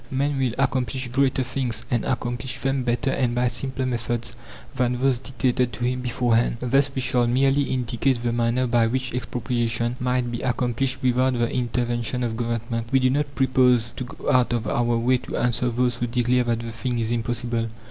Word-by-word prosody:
Man 140 +1 0
will 125 -3 0
accomplish 130 -1 0
greater 130 +1 +2
things, 125 -1 -3
and 120 -2 +1
accomplish 125 0 -2
them 135 0 0
better 125 +2 0
and 125 -3 0
by 125 +1 +2
simpler 130 +2 -3
methods 120 -1 -2 0.4
than 125 0 0
those 130 -2 +2
dictated 125 -2 0
to 120 +3 -3
him 125 +1 -1
beforehand. 120 -2 +1
Thus 135 +3 +2
we 130 - 0
shall 125 -1 +2
merely 135 +3 +3
indicate 125 0 0
the 120 - +1
manner 120 +2 +1
by 120 -2 +3
which 130 +1 -2
expropriation 120 -1 -1
might 125 -1 0
be 120 - -4
accomplished 130 +1 -1
without 130 +1 +3
the 120 -1 0
intervention 120 0 -1
of 115 -2 -1
Government. 115 0 -2
We 135 - +5
do 130 0 +3
not 145 0 -1
propose 125 -3 +3
to 130 - -6
go 125 - -3
out 125 -2 +3
of 120 -1 -1
our 120 -1 +1
way 125 +2 +2
to - - -6
answer 120 +1 +1
those 120 0 0
who 120 - -1
declare 125 +1 +1
that 115 -1 0
the 115 0 -6
thing 120 +2 -3
is 115 0 -1
impossible. 120 0 -1
125 Hz, 190 wpm, -24 LUFS, 120-130 Hz, 0.4 s, We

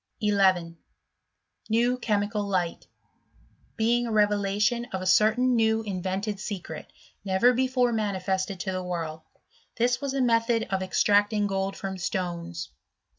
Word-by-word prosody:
1 210 -1 +1
1. 180 -4 +2 0.9
New 240 +3 +2
chemical 210 -2 0
Light; 185 -4 -2 0.9
being 235 +2 +2
a - - -3
revelation 210 +2 +1
of 190 -6 -5
a - - -5
certain 230 +6 +4
new 220 -1 +2
invented 195 +1 -3
secret, 190 -7 -6 0.3
never 200 +6 +3
before 255 -1 +1
manifested 190 -3 -1
to 190 - -2
the 185 0 -3
world. 165 -3 -4 0.3
— - - -35
This 245 +1 +1
was 275 -1 -3
a 270 - +1
method 230 -1 +2
of 190 -1 0
extracting 205 +2 +2
gold 195 0 -2
from 190 -1 -5
stones. 175 -2 -4
205 Hz, 135 wpm, -26 LUFS, 190-230 Hz, 0.9 s, certain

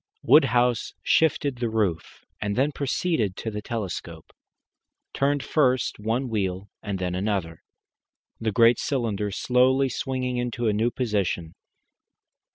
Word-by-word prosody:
Woodhouse 125 -5 +3
shifted 145 -4 +2
the 120 -1 -1
roof, 105 -7 -2 0.2
and 100 -1 -1
then 140 +4 +2
proceeding 140 - -1
to 110 +3 -5
the 105 0 -5
telescope, 95 -7 -6 0.8
turned 140 0 +1
first 130 -8 +1
one 115 +5 -1
wheel 100 -3 -2
and 100 -3 -3
then 90 -1 -2
another, 90 -4 -2 0.8
the 110 -1 -1
great 115 +2 +5
cylinder 110 -7 -1
slowly 130 +5 +2
swinging 130 0 -2
into 120 -1 -2
a 105 - +2
new 110 +3 +1
position. 100 -9 -2
115 Hz, 125 wpm, -25 LUFS, 100-130 Hz, 0.8 s, great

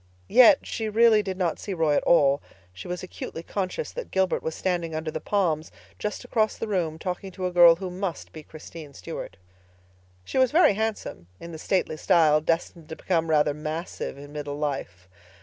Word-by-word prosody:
Yet 265 +3 +6
she 220 -1 -3
really 220 0 +5
did 190 -2 -5
not 175 -4 -1
see 195 - -5
Roy 160 -3 +2
at - - +2
all. 140 -4 +4 0.3
She 90 - -9
was 180 +1 -5
acutely 165 -2 -7
conscious 195 - -3
that - - -7
Gilbert 190 -1 +1
was 160 - -4
standing 175 -3 -2
under 155 0 -3
the 155 - -5
palms 165 -6 0 0.3
just 210 +4 -4
across 220 -3 0
the 225 - -4
room 170 -6 -1
talking 180 +3 -5
to 185 -1 -4
a 180 - -1
girl 175 -1 +7
who 185 +1 -6
must 185 -1 -5
be 155 - -8
Christine 155 -1 -11
Stuart. - - -7 0.9
She 260 - -1
was 260 -1 +4
very 320 - +5
handsome, 215 - -4
in 170 - -9
the 160 - -8
stately 180 -2 -1
style 155 -2 +4
destined 165 0 -2
to 160 - -6
become 165 -2 -1
rather 150 -1 +3
massive 155 0 -5
in 145 +1 -11
middle 145 -1 -5
life. 135 -12 -4
170 Hz, 190 wpm, -25 LUFS, 155-195 Hz, 0.9 s, girl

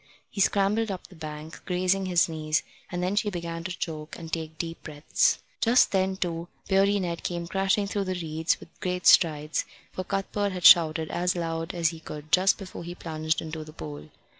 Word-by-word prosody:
He 200 - -2
scrambled 205 +3 +2
up 190 -2 -5
the 185 - -14
bank, 155 0 -8
grazing 185 +1 +1
his 175 -2 +3
knees, 155 -1 -1 0.3
and 175 0 -2
then 185 +3 0
she 210 0 +1
began 170 -3 -5
to 185 0 -4
choke 155 -3 -5
and 165 -1 -9
take 160 -1 -3
deep 165 0 -5
breaths. 155 - +1 0.2
Just 240 +2 +4
then, 190 -1 +1
too, 170 -2 -3 0.2
Beardy 195 +1 +3
Ned 170 -3 -3
came 170 -1 -3
crashing 195 +3 +1
through 200 0 -2
the 185 -1 -2
reeds 160 0 0
with - - -13
great 180 0 -2
strides, 155 -3 +4 0.3
for 185 - -4
Cuthbert 195 +1 -1
had 180 -1 -4
shouted 160 -2 +7
as 180 +1 0
loud 165 0 -3
as 170 -1 +2
he 165 -1 -8
could 150 -1 -9
just 185 +1 +4
before 185 -3 -8
he 175 +1 -7
plunged 155 -2 -2
into 160 0 -5
the 155 0 -12
pool. 75 - -8
175 Hz, 195 wpm, -27 LUFS, 160-190 Hz, 0.3 s, shouted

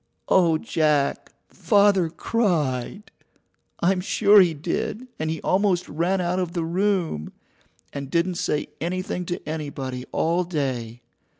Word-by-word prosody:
Oh, 170 -4 +4
Jack! 150 -3 0 0.2
Father 200 -1 +3
cried! 170 - -1 0.7
I'm 180 +1 +2
sure 205 +2 +5
he 170 -3 +2
did, 175 - -3
and 155 0 -1
he 160 0 -2
almost 185 -2 +1
ran 175 +5 0
out 180 +1 0
of 175 -2 -2
the 170 -2 -1
room, 175 - -1 0.6
and 140 -1 -5
didn't 170 +3 0
say 150 - -1
anything 180 +1 -3
to 175 - -5
anybody 140 -5 -5
all 170 +3 +1
day. 130 -8 -3
170 Hz, 125 wpm, -24 LUFS, 150-185 Hz, 0.7 s, sure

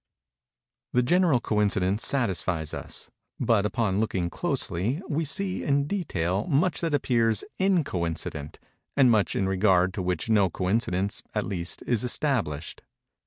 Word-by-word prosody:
The 125 - +3
general 170 -1 +3
coincidence 105 -1 +1
satisfies 95 - 0
us; - - -5 0.3
but, 105 -3 +2
upon 105 -3 0
looking 95 -5 -1
closely, 105 - -1
we 160 +1 -1
see, 185 +5 -1
in 140 0 +2
detail, 100 - -1
much 155 +4 +1
that 165 -3 +1
appears 115 -5 +2 0.2
_in_coincident, 85 - -1 0.4
and 130 -3 +6
much 105 -3 +2
in 95 - +1
regard 95 -1 +3
to 95 - -3
which 90 0 -2
no 105 -4 +4
coincidence, 95 +1 -1
at 105 - 0
least, 90 -3 -3
is 120 -2 +1
established. 120 - -1
105 Hz, 130 wpm, -26 LUFS, 90-135 Hz, 0.4 s, and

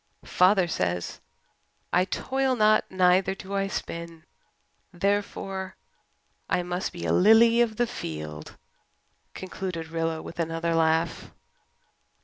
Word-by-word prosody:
Father 185 0 +3
says 90 - -2 0.7
I 180 +1 +4
toil 265 +6 -1
not 215 -2 +3
neither 185 +1 +3
do 195 +1 -9
I 195 0 0
spin. 170 -3 -6 0.7
Therefore, 195 0 -2 0.7
I 180 - +1
must 180 +1 -3
be 175 - -7
a - - +1
lily 230 +4 +6
of 225 -2 +1
the 240 - +1
field," 75 - -7 0.8
concluded 185 -3 -5
Rilla, 165 -1 -2
with 170 - -10
another 165 0 -1
laugh. 160 0 +1
180 Hz, 115 wpm, -26 LUFS, 165-200 Hz, 0.8 s, lily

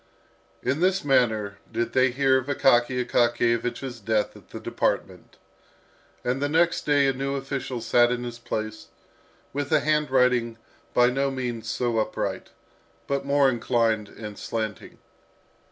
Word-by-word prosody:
In 140 - 0
this 185 0 +1
manner 110 -7 +1
did 115 +1 -2
they 130 0 +4
hear 130 +1 +3
of 130 - -8
Akaky 125 -2 +2
Akakiyevich's 120 +1 0
death 110 0 0
at - - -16
the - - -7
department. - - -3 0.9
And 125 +2 -1
the 145 - 0
next 165 +2 +2
day 145 -1 +4
a 135 - +2
new 135 +1 -2
official 135 -2 -4
sat 120 +1 +3
in 125 0 -2
his 120 -1 -6
place, 110 -2 -5 0.7
with 145 +1 -3
a 155 -2 +4
handwriting 125 -6 +2 0.4
by 125 0 +5
no 135 +2 0
means 120 -4 -4
so 120 -2 0
upright, 110 - -3 0.6
but 140 0 -2
more 140 0 +4
inclined 115 -4 +1
and 105 -2 -9
slanting. 110 -3 -5
125 Hz, 140 wpm, -25 LUFS, 115-135 Hz, 0.9 s, by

